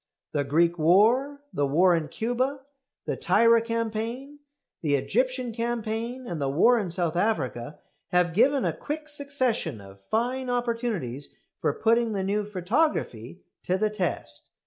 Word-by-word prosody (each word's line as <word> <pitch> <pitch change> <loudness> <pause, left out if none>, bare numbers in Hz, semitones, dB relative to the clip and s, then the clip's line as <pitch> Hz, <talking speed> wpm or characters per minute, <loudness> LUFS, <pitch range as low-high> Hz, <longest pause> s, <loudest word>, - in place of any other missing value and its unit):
The 145 - 0
Greek 165 +4 +2
war, 235 - +3
the 145 - +1
war 175 +5 +4
in 160 -2 -2
Cuba, 255 - -2 0.4
the - - -1
Tirah 230 0 +4
campaign, 230 +5 -3 0.4
the 145 -3 +2
Egyptian 255 - 0
campaign, 235 +2 -3
and 170 -9 -5
the 135 - 0
war 230 - +4
in 195 -4 -3
South 170 -1 -1
Africa, 150 - -1 0.3
have 180 -2 +2
given 265 - +3
a - - 0
quick 305 +1 -5
succession 260 - -1
of 100 0 -14
fine 245 - -1
opportunities 230 - -2 0.2
for - - +1
putting 230 +6 +2
the 195 -2 -1
new 205 +2 0
photography 185 - -1 0.2
to 185 - 0
the 215 +2 0
test. 170 - -4
220 Hz, 145 wpm, -26 LUFS, 165-245 Hz, 0.4 s, war